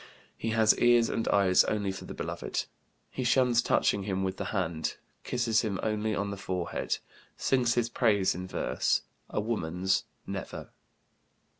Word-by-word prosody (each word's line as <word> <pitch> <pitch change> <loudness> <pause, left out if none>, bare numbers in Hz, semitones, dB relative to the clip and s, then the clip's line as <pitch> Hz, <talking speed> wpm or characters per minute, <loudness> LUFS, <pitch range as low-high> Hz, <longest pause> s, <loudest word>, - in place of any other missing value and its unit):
He 115 - -3
has 110 -1 +4
ears 120 -1 +5
and 115 - -1
eyes 95 -2 +5
only 100 -2 0
for 95 - -8
the - - -8
beloved. - - -3 0.5
He 130 - -3
shuns 120 -1 +4
touching 100 - +2
him 95 -1 -2
with 95 0 -2
the - - -3
hand, 85 -6 -2 0.3
kisses 115 -3 +1
him 100 -4 -2
only 110 0 0
on 100 0 -2
the 100 - -5
forehead, 95 -3 -2 0.4
sings 125 -3 +2
his 120 -1 +2
praise 105 -5 +2
in 90 +2 -6
verse, - - 0 0.3
a - - -1
woman's 95 -4 0 0.2
never." - - -6
105 Hz, 155 wpm, -29 LUFS, 95-115 Hz, 0.5 s, ears